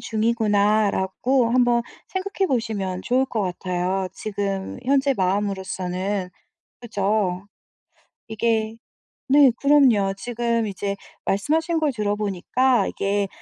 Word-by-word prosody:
중이구나.'라고 215 +1 +1
한번 240 -1 +3 0.3
생각해 390 +1 -2
보시면 205 -7 -2
좋을 255 +2 +2
것 225 -4 -2
같아요 185 +1 -2
지금 200 -1 -4
현재 275 +1 +2
마음으로서는. 190 -1 -2 0.5
그죠. 200 -4 -1 0.8
이게 220 0 0 0.5
네. 280 -1 +6
그럼요. 260 -9 +4
지금 235 0 -1
이제 200 0 -3 0.3
말씀하신 320 - 0
걸 305 -2 +1
들어보니까 210 +2 0
이게 200 0 -1
215 Hz, 240 characters per minute, -23 LUFS, 195-245 Hz, 0.8 s, 네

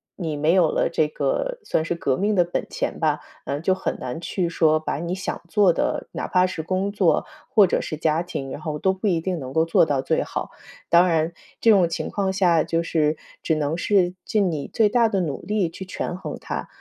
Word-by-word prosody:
你 160 -5 -3
没 155 +3 +2
有 180 -4 +4
了 - - +1
这 155 - +2
个 320 - -2
算 160 - 0
是 175 - -1
革 135 -6 0
命 205 +2 +1
的 180 - +5
本 175 - -3
钱 - - -3
吧， - - +1 0.2
呃， 145 +2 -3
就 185 +3 +2
很 190 - -3
难 125 +4 -5
去 175 0 -2
说 155 -2 +3
把 155 -2 -3
你 170 +3 -3
想 190 - -4
做 200 0 +4
的， - - -1
哪 - - -4
怕 180 0 +3
是 180 -3 -3
工 185 +4 -1
作 195 -5 +2 0.2
或 210 - +5
者 - - +1
是 165 - -4
家 155 +1 +1
庭， 140 -6 -5
然 - - -6
后 155 -1 -4
都 190 - +2
不 190 +2 -3
一 170 -4 +2
定 180 0 -2
能 130 -2 -7
够 160 - +3
做 165 0 +4
到 145 -3 0
最 - - 0
好。 - - -5 0.4
当 175 +2 +6
然， 165 -1 +1 0.3
这 230 - +6
种 190 -5 +5
情 165 - -3
况 195 -2 -1
下， 175 -4 +3
就 165 0 0
是 155 -2 +1 0.3
只 160 - +1
能 155 +1 -1
是 180 -2 +2
尽 200 -4 +1
你 150 -3 -4
最 220 -2 +4
大 235 +1 +4
的 200 -4 0
努 155 -5 -3
力 205 -4 0
去 190 +3 -8
权 180 -1 -4
衡 190 - -6
它， - - -4
170 Hz, 250 characters per minute, -23 LUFS, 155-190 Hz, 0.4 s, 当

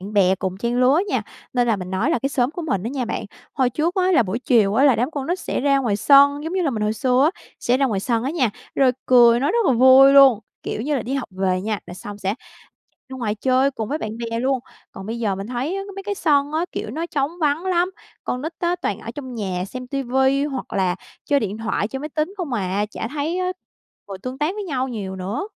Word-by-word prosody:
bạn 200 +3 -8
bè 190 -2 +4
cùng 190 0 -4
trang 240 +2 0
lứa 270 +6 +4
nha. - - 0 0.3
Nên 245 -1 +2
là 225 - +3
mình 185 -1 -7
nói 205 - 0
là 330 - +2
cái 275 - -1
xóm 255 -2 0
của 340 +2 -6
mình 200 - -1
á 230 - -3
nha 265 -2 -2
bạn, - - -4 0.3
hồi 260 -3 +2
trước 320 +7 -1
á, 370 0 +2
là 245 - +5
buổi 200 +3 -3
chiều 230 -6 +3
á, 270 +5 +4
là 270 -4 +6
đám 245 +7 0
con 280 -3 -4
nít 355 +2 -1
sẽ - - -2
ra 275 0 +3
ngoài 230 -7 0
sân, 285 +4 +5
giống 325 - -4
như 375 -1 0
là 290 - +1
mình 215 -3 -3
hồi 210 - +1
xưa 255 +6 +2
á, - - -20 0.2
sẽ 245 - +2
ra 275 0 +2
ngoài 205 -6 -1
sân 230 +2 0
á 275 - -1
nha, 265 -9 +1 0.2
rồi 265 -2 +4
cười 240 -2 +6
nói 285 +6 +1
rất 465 -4 +2
là 265 - +4
vui 260 +3 +7
luôn, 270 -6 +7 0.2
kiểu 220 - -4
như 295 +1 0
là, - - -2
đi 260 - -3
học 270 -3 -3
về 185 -1 0
nha 215 +1 -2
là 175 - -8
xong 205 +2 -9
sẽ 195 +1 -1 0.6
chạy - - -50
ra 265 - -7
ngoài 215 -3 -1
chơi 260 +4 +2
cùng 220 -5 -5
với 300 - -2
bạn 215 - -4
bè 230 -1 -3
luôn. 265 +1 +1 0.3
Còn 190 +1 -9
bây 230 +1 -4
giờ 210 -4 0
mình 195 +1 -6
thấy 255 +9 -3
á 390 - -3
mấy 390 - -5
cái 405 +1 -3
sân 290 -5 +2
á, 320 +2 0
kiểu - - -4
nó 320 +7 -3
trống 285 -2 -1
vắng 300 +2 +1
lắm. 360 0 +1 0.3
Con 250 - -3
nít 320 +3 -4
á, 350 0 0
toàn 200 - -1
ở 230 - -7
trong 260 -4 -7
nhà 185 -5 -3
xem 255 +6 -7
TV 265 -1 -4 0.4
hoặc 260 - -6
là 185 -2 +1 0.3
chơi 285 -1 +2
điện 210 0 -3
thoại, 220 -2 -1
chơi 265 +3 -5
máy 300 - -5
tính 315 +6 -2
không 340 -8 -4
à, 205 -1 -1
chả 225 - -5
thấy 305 +4 -2
á 365 0 -1 0.6
ngồi 195 -1 -7
tương 255 +1 -5
tác 305 +5 0
với 415 - -4
nhau 265 -7 -2
nhiều 200 -6 -5
nữa. 200 - -3
255 Hz, 270 wpm, -22 LUFS, 215-290 Hz, 0.6 s, vui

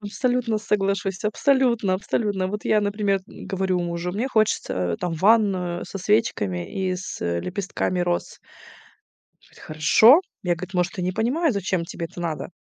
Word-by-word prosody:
Абсолютно 230 +2 -1
соглашусь. 195 -2 -1
Абсолютно 235 -3 +2
абсолютно. 195 0 -1
Вот 210 +1 -5
я, 215 - +3
например, 205 -1 0
м, - - -11
говорю 190 -2 -1
мужу: 170 +1 -3
"Мне 235 +7 -2
хочется, 90 - 0
там, 175 - -2
ванную 190 -2 +2
со 195 - -6
свечками 185 - 0
и - - 0
с, 185 - -7
э, 85 0 -1
лепестками 185 - -2
роз". 175 0 -2 1.0
Говорит: - - -21
"Хорошо". 220 - +6 0.2
Я, 180 -2 +1
говорит: 185 +3 -9
"Может, 180 +3 -1
и - - -1
не 185 +1 -1
понимаю, 265 - +1
зачем 190 -3 -1
тебе 170 0 -5
это 175 - -10
надо, 165 -1 -4
195 Hz, 155 wpm, -23 LUFS, 175-215 Hz, 1.0 s, Хорошо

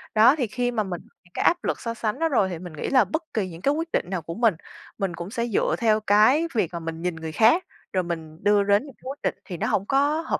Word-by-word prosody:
Đó, 225 +6 +7
thì 260 -6 -1
khi 245 +3 -1
mà 225 -3 0
mình 180 -3 -5 0.2
những 175 - -26
cái - - -1
áp 350 +1 +3
lực - - -1
so 230 - -3
sánh 225 +2 -3
đó 325 0 +2
rồi 210 -9 +2
thì 175 -3 -5
mình 175 -2 -9
nghĩ 155 - -4
là 255 -5 +5
bất 315 - -3
kỳ 205 -5 -1
những 165 0 -10
cái 280 - +2
quyết 325 +2 -2
định - - +1
nào 185 -3 -2
của 165 +2 -6
mình, 225 -5 +3 0.4
mình 195 -4 -2
cũng 170 +2 -6
sẽ 235 0 -2
dựa 220 - +1
theo 220 -2 +3
cái 215 +10 +4
việc 200 -8 0
mà 170 - -3
mình 165 0 -6
nhìn 180 -1 -2
người 160 0 -6
khác, 230 - +4 0.3
rồi 185 -1 +1
mình 165 -1 -6
đưa 205 0 +4
đến 200 +5 +3
những 275 - -12
cái - - -31
quyết 275 - -7
định - - 0
thì 180 - -6
nó - - -1
hổng 195 - 0
có 285 +4 +2
hợp 330 - -2
210 Hz, 295 wpm, -24 LUFS, 175-255 Hz, 0.4 s, Đó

